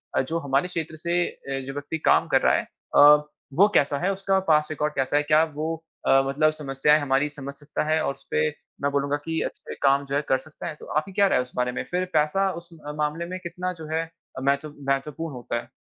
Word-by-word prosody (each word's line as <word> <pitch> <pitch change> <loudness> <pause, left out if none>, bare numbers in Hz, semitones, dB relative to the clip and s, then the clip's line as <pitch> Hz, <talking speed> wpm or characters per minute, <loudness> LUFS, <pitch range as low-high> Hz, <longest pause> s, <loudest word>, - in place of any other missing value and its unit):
अ, - - +4
जो 160 +6 -2
हमारे 140 +2 +1
क्षेत्र 165 -3 -4
से 175 +1 +2
अ, 135 -1 -5
जो 135 - -4
व्यक्ति 145 +3 -4
काम - - +4
कर - - +3
रहा - - +4
है - - -1 0.3
अ, 150 +1 +8 0.3
वो 195 +8 +6
कैसा 145 -3 +3
है 185 +5 +1
उसका 195 0 +1
पास्ट 150 0 +3
रिकॉर्ड 150 0 -1
कैसा 135 +1 +1
है? 150 - +2
क्या 155 +1 +4
वो 160 +1 -3 0.3
अ, 135 - +6
मतलब 150 +3 +3
समस्याएँ 150 0 +2
हमारी 140 +1 +1
समझ 140 -2 -8
सकता 145 -1 -3
है 160 0 +3
और - - 0
उसपे 75 - -1 0.3
मैं 140 0 +1
बोलूँगा 140 0 0
कि 160 0 -1
अच्छे - - -5
काम 140 0 +4
जो 140 0 -3
है 145 - +2
कर 130 - +4
सकता 155 +5 -9
है? 160 - -5
तो - - -13
आपकी 155 +6 -2
क्या 200 +1 +4
राय - - +3
है - - +3
उस 125 - -16
बारे 125 0 0
में? 125 - -3
फ़िर 180 +1 0
पैसा 160 +6 +2
उस 170 - -18 0.3
मामले 150 +3 -1
में 185 +2 -5
कितना 180 +1 -3
जो 160 -3 -9
है 160 +1 +1 0.4
महत्व 140 +2 0 0.2
महत्वपूर्ण 150 +3 -2
होता 120 -1 -4
है? 120 - -18
150 Hz, 235 wpm, -25 LUFS, 140-165 Hz, 0.4 s, अ